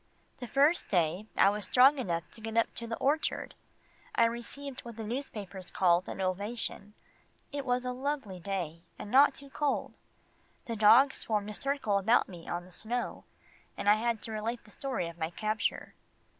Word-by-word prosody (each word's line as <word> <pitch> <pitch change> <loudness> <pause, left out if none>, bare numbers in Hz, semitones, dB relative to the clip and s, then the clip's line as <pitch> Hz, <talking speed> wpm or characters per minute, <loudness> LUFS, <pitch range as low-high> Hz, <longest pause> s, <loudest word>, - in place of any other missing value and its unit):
The 245 - -6
first 290 +7 +3
day 180 +2 +1
I 195 - +6
was 205 -1 -3
strong 270 +6 +6
enough 170 -8 -1
to 225 - -11
get 225 +1 -4
up 230 - +2
to 235 - -6
the 230 - -3
orchard, 295 +4 0 0.6
I 230 - +5
received 250 +4 -4
what 235 -2 -9
the 225 - -4
newspapers 210 -6 -5
call 175 -1 +3
an - - -6
"ovation." 200 +2 -3 0.6
It 280 -2 -4
was 250 0 +1
a 250 - -1
lovely 260 -8 -3
day, 175 -4 -4 0.2
and 205 - -8
not 275 +3 +6
too 280 0 -11
cold. 290 -1 -1 0.7
The 230 - -3
dogs 225 +6 +6
formed 210 -1 -1
a - - -6
circle 275 -5 0
about 225 +5 +3
me 175 -3 -10
on 175 0 -3
the 185 - -16
snow, 240 +6 -4 0.5
and - - -4
I 205 - +8
had 230 0 -1
to 225 - -4
relate 225 +2 -3
the 210 - -18
story 260 -10 -3
of 170 0 -10
my 160 0 -1
capture. 215 +5 -2
220 Hz, 185 wpm, -31 LUFS, 195-250 Hz, 0.7 s, I